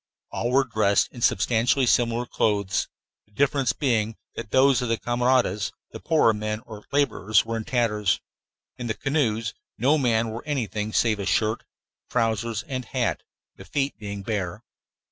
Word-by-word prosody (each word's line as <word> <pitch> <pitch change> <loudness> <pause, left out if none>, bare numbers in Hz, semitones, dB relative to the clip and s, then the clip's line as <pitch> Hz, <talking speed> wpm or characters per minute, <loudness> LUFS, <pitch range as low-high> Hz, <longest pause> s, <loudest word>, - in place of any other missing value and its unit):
All 120 - -2
were 135 +2 +4
dressed 110 -5 +2
in 120 - -10
substantially 120 +5 +2
similar 120 0 +2
clothes, 100 -5 0 0.4
the 105 - -31
difference 135 0 +2
being 115 -5 0 0.2
that 115 -2 -7
those 130 0 +4
of 125 - -2
the 115 - +1
camaradas, 120 -4 +1 0.2
the - - -8
poorer 155 -9 +3
men 105 +1 -3
or 110 -4 -11
laborers, 110 -8 +2
were 115 0 -3
in 110 -1 -4
tatters. 105 -5 +1 0.6
In 120 - -5
the 110 - -1
canoes 115 -7 0 0.2
no 140 +7 +3
man 115 -3 +2
wore 110 +1 -5
anything 110 -7 -2
save 110 -1 +2
a 100 - -3
shirt, 110 +5 +1 0.4
trousers, 115 -2 0
and 130 0 -5
hat, - - -1 0.4
the - - -10
feet 140 -1 -1
being 100 -2 -6
bare. 95 -5 -3
115 Hz, 160 wpm, -25 LUFS, 105-125 Hz, 0.6 s, were